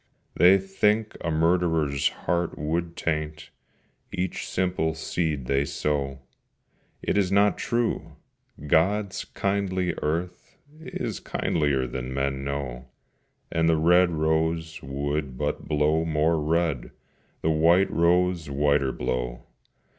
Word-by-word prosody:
They 90 +2 +6
think 105 +3 0
a 85 - -2
murderer's 80 -3 +2 0.2
heart 85 -1 0
would 85 +2 -2
taint 75 -1 -3 0.6
Each 90 0 -3
simple 90 -4 0
seed 80 -3 -2
they 70 +2 +1
sow. 70 -1 -2 0.8
It - - +1
is 95 -2 +1
not 100 +1 +3
true! 120 -1 -1 0.5
God's 95 +6 +1
kindly 95 -3 -1
earth 85 +4 -3 0.2
Is 160 - -5
kindlier 70 -5 0
than 65 +1 -5
men 70 0 -1
know, 70 -3 -4 0.6
And 80 0 +2
the 80 - +3
red 90 +3 +5
rose 80 +1 0
would 70 0 -3
but 75 +1 -3
blow 75 +2 +2
more 80 0 +1
red, 80 -4 0 0.5
The 80 - +3
white 85 +5 +4
rose 85 -1 +2
whiter 70 -1 +2
blow. 60 -1 -3
80 Hz, 115 wpm, -26 LUFS, 70-90 Hz, 0.8 s, They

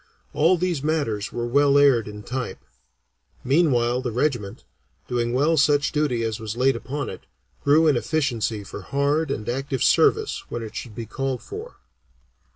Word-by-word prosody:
All 170 +4 +3
these 175 -4 -1
matters 140 -9 -1
were 120 0 -3
well 140 +3 +3
aired 135 -6 +4
in 105 0 -8
type; 125 +2 -4 0.9
meanwhile 125 -4 +2
the 125 -2 -3
regiment, 120 -5 -2 0.4
doing 120 -1 -1
well 150 +6 +2
such 145 0 +3
duty 145 -6 0
as 110 0 -2
was 110 +1 -5
laid 130 +2 +3
upon 145 +2 -4
it, - - -9 0.4
grew 150 +3 +5
in 150 -3 +4
efficiency 120 -7 -1
for 100 - -8
hard 140 +7 0
and 110 -6 -4
active 135 +1 -2
service - - +3
when 120 - -4
it 110 - -9
should 115 -4 -7
be 115 - -5
called 135 +2 -3
for. 440 +4 -8
135 Hz, 160 wpm, -23 LUFS, 120-145 Hz, 0.9 s, grew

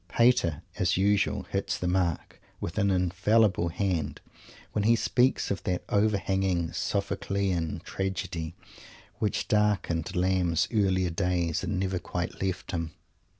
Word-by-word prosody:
Pater, 105 -10 +3 0.2
as 90 -4 +2
usual, 100 +1 +2
hits - - -2
the 90 - -2
mark 90 -2 -1 0.2
with 85 +5 -3
an 100 -1 +3
infallible 95 +1 +2
hand 80 -5 -1 0.5
when 105 - 0
he 115 +1 +6
speaks 125 +2 +2
of 100 - -2
that 90 -1 -1
overhanging 95 -4 +1
Sophoclean 95 -5 -1
tragedy 95 -4 -3 0.6
which 105 - -1
darkened 100 -5 +1
Lamb's 90 -2 +2
earlier 95 -4 +2
days 85 -2 0
and 100 -3 -1
never 95 -1 -1
quite 90 0 -4
left 95 -2 -2
him. 85 -3 -3
95 Hz, 125 wpm, -28 LUFS, 85-100 Hz, 0.6 s, he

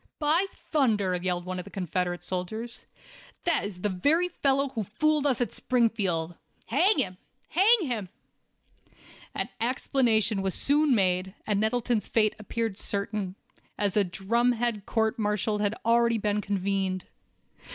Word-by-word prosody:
"By 320 +5 +2 0.2
thunder!" 215 - +2
yelled 180 0 -2
one 185 0 -4
of - - -4
the - - -12
Confederate 180 -1 -2
soldiers, 205 +7 -5 0.6
"that 340 -2 +2
is 190 -3 -7
the 210 - 0
very 300 - +2
fellow 275 -4 +1
who 240 -4 -3
fooled 290 +8 +1
us 265 - +2
at 245 - -1
Springfield. 200 -9 0 0.3
Hang 405 +4 +4
him! 185 -1 -1 0.3
Hang 415 +6 +5
him!" 235 - -3 1.3
An - - -2
explanation 230 -3 +1
was 190 -1 -1
soon 290 -1 +4
made, 185 -1 +1
and 205 -2 +1
Nettleton's 225 +1 0
fate 215 -2 +2
appeared 220 -1 -3
certain, 200 -2 -2 0.4
as 205 -2 0
a 210 - +4
"drumhead" 230 +3 0
court 220 +1 0
martial 210 0 0
had 205 +1 0
already 235 0 +3
been 210 -1 0
convened. 195 -1 -1
215 Hz, 140 wpm, -27 LUFS, 190-245 Hz, 1.3 s, Hang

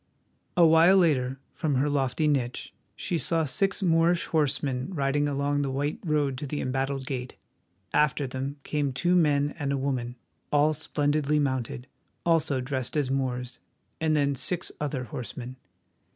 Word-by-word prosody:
A 175 - +7
while 165 +4 +6
later, 135 -7 +2
from 150 -3 -1
her 135 +3 +2
lofty 140 +1 0
niche, 130 -4 -1 0.2
she 170 - -2
saw 165 -1 +1
six 195 +8 0
Moorish 170 0 +3
horsemen 140 -1 0
riding 145 0 +1
along 145 0 0
the 140 - -1
white 145 +3 -2
road 145 -5 0
to 145 - -5
the 145 +2 -3
embattled 135 +1 -2
gate. 130 -2 -4 0.6
After 150 -1 +2
them 130 +2 -4
came 145 -3 -1
two 175 +8 +2
men 145 -4 +3
and 140 -2 -1
a 140 - 0
woman, 130 -3 -2 0.4
all 150 +1 +4
splendidly 150 -1 0
mounted, 130 -3 -1 0.4
also 160 -5 +2
dressed 130 +2 -3
as 140 -3 0
Moors, 125 -2 -2 0.4
and 155 -1 +2
then 140 -1 +2
six 175 +6 0
other 140 -3 -2
horsemen. 120 +2 -7
140 Hz, 150 wpm, -27 LUFS, 130-150 Hz, 0.6 s, A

